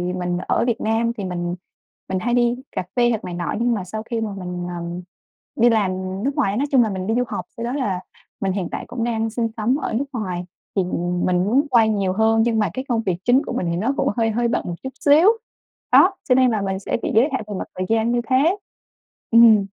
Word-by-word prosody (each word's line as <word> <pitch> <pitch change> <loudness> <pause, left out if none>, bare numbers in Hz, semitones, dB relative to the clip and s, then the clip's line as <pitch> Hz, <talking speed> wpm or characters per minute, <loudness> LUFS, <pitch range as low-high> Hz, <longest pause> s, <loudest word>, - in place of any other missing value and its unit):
mình 180 -1 -2
ở - - +2
Việt 235 - 0
Nam 225 +1 +1
thì 205 - -4
mình 175 -1 -3 0.5
mình 190 0 0
hay 240 +5 -1
đi 240 0 +3 0.2
cà - - -2
phê 240 -1 +4
hoặc 225 -3 -1
này 180 - -5
nọ 175 -3 -3
nhưng 240 +1 +2
mà 205 -4 -2
sau 215 +4 -6
khi 230 0 -3
mà 220 - -2
mình, 180 -1 -5
ờm, 170 +1 -5 0.5
đi 240 +2 +5
làm 215 -5 +2 0.3
nước 275 +2 -1
ngoài 200 +1 +1
nói 275 - +1
chung 260 -3 +5
là 220 - -1
mình 190 -1 -4
đi 225 - +1
du 250 - +2
học - - -4
sau 230 - -4
đó 240 - -2
là 210 -10 -1 0.4
mình 195 - +1
hiện 185 -2 -2
tại - - -4
cũng 240 -2 -4
đang 225 -1 0
sinh 230 +1 -1
sống 230 +5 +1
ở 275 - -3
nước 250 +6 0
ngoài 185 -7 -3 0.3
thì 195 - +2
mình 175 0 -2
mình 180 - +2
muốn 265 +8 +2
quay 230 -4 +4
nhiều 200 -3 0
hơn 220 +2 +3
nhưng 230 -1 +1
mà 210 - +1
cái 260 +1 -4
công 230 -2 +1
việc 185 -5 -1
chính 250 +3 +5
của - - -4
mình 175 - -1
thì - - -1
nó 230 +9 0
cũng - - +1
hơi 225 -1 +2
hơi 235 +2 +1
bận 235 - 0
một 175 - -3
chút 265 - -3
xíu. 300 +5 +5 0.6
Đó, 370 - +7 0.2
cho 255 - +6
nên 255 -1 +4
là 215 -2 0
mình 195 -1 -2
sẽ 195 - -2
bị - - -1
giới 245 +7 +5
hạn 265 - -1
về 210 - -5
mặt - - -4
thời 185 - -1
gian 225 +1 +2
như 240 0 +1
thế, 290 +9 +3 0.7
ừm. 225 -3 +7
225 Hz, 260 wpm, -21 LUFS, 190-240 Hz, 0.7 s, Đó